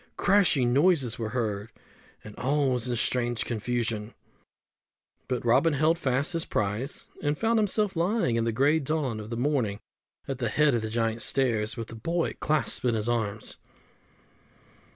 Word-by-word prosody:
Crashing 170 -11 +3
noises 140 -6 +2
were 110 -1 -2
heard, 110 -3 -2 0.5
and 105 -1 -10
all 140 +1 +1
was 125 -1 -2
in 120 - 0
strange 120 0 0
confusion; 115 -1 -2 1.1
but 125 -2 -2
Robin 135 +7 +4
held 155 +4 +2
fast 135 +3 0
his 165 -1 -1
prize, 105 +7 -3
and 145 0 0
found 225 0 +2
himself 210 -1 0
lying 170 - +1
in 115 - +1
the 115 - 0
grey 140 +7 +3
dawn 140 -6 -2
of 105 0 -8
the 115 - -4
morning 120 -6 0 0.5
at 135 -2 -4
the 120 -3 0
head 150 +4 +3
of 120 - +1
the 110 - -4
Giant's 115 0 -1
Stairs 120 -3 0
with 115 -1 -5
the 115 - -8
boy 165 +10 -1
clasped 155 -2 0
in 120 -2 +2
his 110 0 -2
arms. 110 -3 -2
125 Hz, 165 wpm, -27 LUFS, 115-150 Hz, 1.1 s, Robin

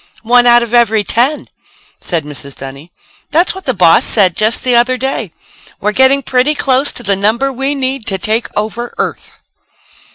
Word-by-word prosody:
"One 245 +1 +3
out 240 0 +5
of 235 0 -7
every 225 -3 +2
ten!" 255 +8 -1 0.5
said 170 -4 -3
Mrs. 140 -2 -9
Dunny. 140 +5 -10 0.4
"That's 335 +5 +1
what 380 0 -11
the 260 - +1
boss 170 -3 +4
said 190 -6 +2
just 215 +2 0
the 250 -1 +2
other 250 +2 +2
day. 255 -7 -3 0.5
'We're 210 - -1
getting 265 +4 +3
pretty 260 +5 +1
close 270 0 +3
to 245 - -2
the 200 -2 +1
number 225 +8 -1
we 270 +3 -2
need 265 -3 -3
to 195 - 0
take 220 +5 -1
over 220 +3 -4
Earth.'" - - -4
240 Hz, 175 wpm, -13 LUFS, 205-265 Hz, 0.5 s, out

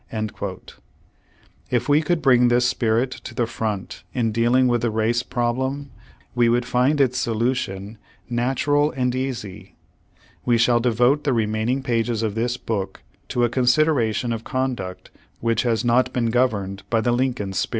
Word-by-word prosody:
^ 105 -3 -5 1.0
If - - 0
we 145 +1 +4
could 165 -1 -1
bring 125 -2 +5
this 120 +1 +3
spirit 120 +2 +1
to 120 - -9
the 120 - +1
front 105 -5 -4
in 115 -3 +1
dealing 120 +3 +3
with 120 -1 +1
the 120 - +1
race 110 +2 +1
problem, 130 +4 -2 0.4
we 120 -1 +3
would 120 +1 +1
find 125 +5 +2
its 130 -2 +2
solution 110 -3 -2 0.3
natural 135 +5 +1
and 125 -4 -1
easy. 130 -7 -5 0.7
We 120 -1 +3
shall 120 +1 +3
devote 125 +5 +2
the 140 - +1
remaining 110 +3 0
pages 115 -2 0
of 110 -2 -1
this 120 +3 -1
book 100 -6 -4 0.2
to 120 - 0
a 120 - +3
consideration 125 -3 +2
of 115 0 -5
conduct 125 -9 -4 0.3
which 115 -1 +1
has 115 -1 0
not 120 +2 +3
been 115 -2 0
governed 105 -6 0
by 115 -1 +2
the 120 - +1
Lincoln 120 -5 -1
spirit. - - -1
120 Hz, 160 wpm, -22 LUFS, 110-130 Hz, 1.0 s, bring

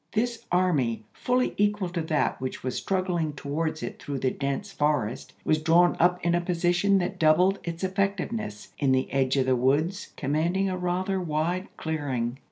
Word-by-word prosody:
This 235 +1 -1
army, 150 -12 +1
fully 250 0 0
equal 205 -2 +1
to 175 -1 -2
that 155 -4 0
which 130 - -4
was 130 0 -2
struggling 180 -5 -1
to 140 - -10
wards 155 +2 -2
it - - -6
through 140 -1 -4
the 130 0 0
dense 140 +8 -3
forest, 145 -7 -1
was 155 0 +2
drawn 170 +3 +4
up 180 +1 +4
in 170 - +3
a 175 - +2
position 175 +3 +2
that 180 -1 -2
doubled 180 +5 +4
its 170 +1 -5
effectiveness, 195 - -2
in 135 -3 +3
the 130 0 0
edge 135 0 +1
of 130 - +3
the 130 -1 +3
woods 150 +10 +1
commanding 165 +7 0
a - - -1
rather 185 +1 -1
wide 175 +3 -1
clearing. 135 -6 -2
170 Hz, 175 wpm, -27 LUFS, 140-185 Hz, -, drawn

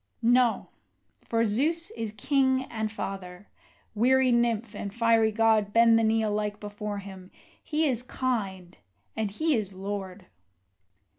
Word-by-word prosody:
No! 245 0 +3 0.5
for 230 0 0
Zeus 310 +11 0
is 225 -2 -5
King 260 +2 +2
and 220 -2 -3
Father. 195 -2 -7 0.5
Weary 255 +4 +3
nymph 235 -2 +1
and 205 -1 -5
fiery 230 0 +3
god, 215 -2 +2
Bend 230 0 +5
the - - +1
knee 220 0 +2
alike 210 -1 -2
before 210 0 -5
him 190 -2 -10 0.3
he 310 +1 0
is 250 -5 +1
kind, 200 - -4 0.4
and 215 -2 -1
he 310 +10 0
is 210 -6 -2
lord! 190 -1 -6
220 Hz, 135 wpm, -27 LUFS, 205-240 Hz, 0.5 s, Bend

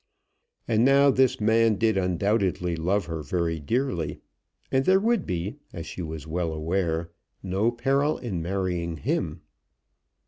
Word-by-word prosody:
And 115 0 +3
now 140 +1 +6
this 130 0 +2
man 110 +1 +3
did 110 +1 +2
undoubtedly 90 -1 0
love 95 +5 0
her 80 -2 -4
very 85 0 -1
dearly, 85 - -1 0.5
and 130 0 +3
there 190 +1 +5
would 225 -2 +1
be, 90 - -3 0.2
as 85 -2 -6
she 85 +2 -7
was 80 -2 -6
well 85 +1 -2
aware, 85 +1 -1 0.3
no 95 +4 +1
peril 135 +5 +1
in 95 -9 -4
marrying 90 -2 -2
him. - - -2
95 Hz, 140 wpm, -26 LUFS, 85-120 Hz, 0.5 s, now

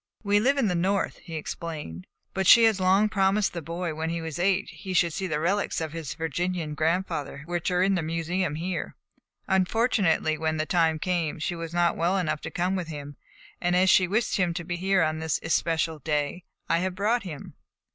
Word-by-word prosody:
"We 205 0 +3
live 270 +6 +2
in 260 -6 +2
the 180 - +1
North," 190 +3 0
he 165 - -9
explained, 150 - -6 0.3
"but 190 -1 0
she 235 - +9
has 220 -3 +4
long 190 +3 +4
promised 200 0 +1
the 170 - -4
boy 170 +3 -4
that 155 - -4
when 160 +1 -2
he 170 0 -2
was 160 -1 -5
eight 195 +2 +2
he 190 - -7
should 170 -2 +3
see 190 - -2
the 150 -3 -1
relics 195 +6 0
of 160 -2 -4
his 160 -5 -5
Virginian 165 0 -2
grandfather 160 -2 -1
which 175 +1 -2
are 180 0 +2
in 195 +1 +3
the 180 - +1
museum 165 +1 -1
here. 175 +2 -4 0.5
Unfortunately, 190 -5 +2
when 160 0 0
the 155 - 0
time 165 -2 +2
came, 170 -2 -1
she 155 +3 -2
was 165 -1 -6
not 175 0 +2
well 175 +4 +1
enough 155 -5 -1
to - - -5
come 180 +2 -1
with 180 -3 -3
him; 145 -2 -7 0.5
and 175 0 +1
as 185 +1 +5
she 185 - +5
wished 220 +6 0
him 175 -3 +1
to 175 - -3
be 175 +1 -3
here 190 0 +2
on 155 0 -1
this 160 -1 -1
especial 160 -1 0
day, 150 +4 -2 0.2
I 165 - +2
have 185 0 -2
brought 220 +5 +1
him." 160 -7 -8
175 Hz, 215 wpm, -26 LUFS, 160-190 Hz, 0.5 s, she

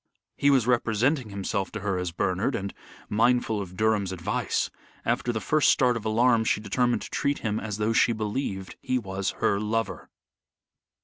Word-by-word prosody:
He 140 - +3
was 135 -5 +4
representing 120 +2 +1
himself 100 0 -2
to 105 - -4
her 95 -2 -1
as 90 -1 -2
Bernard, 95 +9 0
and, 100 -2 -4 0.3
mindful 110 -1 +2
of 90 -2 -8
Durham's 110 -3 +1
advice, 90 -3 -1 0.3
after 120 - 0
the 110 - -2
first 150 +7 +3
start 125 -2 +3
of 115 - -5
alarm 115 +1 +3
she 110 - +1
determined 120 +4 0
to - - -8
treat 140 0 0
him 110 0 0
as 105 -2 -4
though 110 +1 +1
she 115 - +4
believed 105 -3 -3
he 130 - 0
was 95 -4 -2 0.2
her 100 - +3
lover. 110 +2 -2
110 Hz, 175 wpm, -26 LUFS, 100-120 Hz, 0.3 s, was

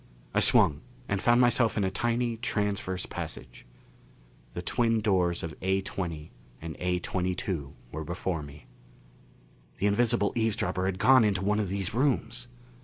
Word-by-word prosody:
I - - +3
swung 75 -2 +4 0.3
and 100 -1 -1
found 120 +1 +4
myself 120 -2 +3
in 105 - +2
a 95 - 0
tiny 120 +3 0
transverse 105 -5 -1
passage. 60 -1 -7 0.9
The - - -4
twin 115 -2 +1
doors 90 -4 +1
of 80 -2 -4
A20 95 -4 -2 0.3
and 80 -1 -7
A22 90 -3 -2 0.2
were 80 +1 -5
before 85 +1 -3
me. 70 0 -11 1.1
The - - -1
invisible 105 0 +2
eavesdropper 100 -5 0
had 95 -1 -2
gone 130 +5 +6
into 100 -3 +1
one 105 +1 +2
of 100 -3 -1
these 100 0 -2
rooms! 125 -2 0
95 Hz, 140 wpm, -28 LUFS, 90-115 Hz, 1.1 s, gone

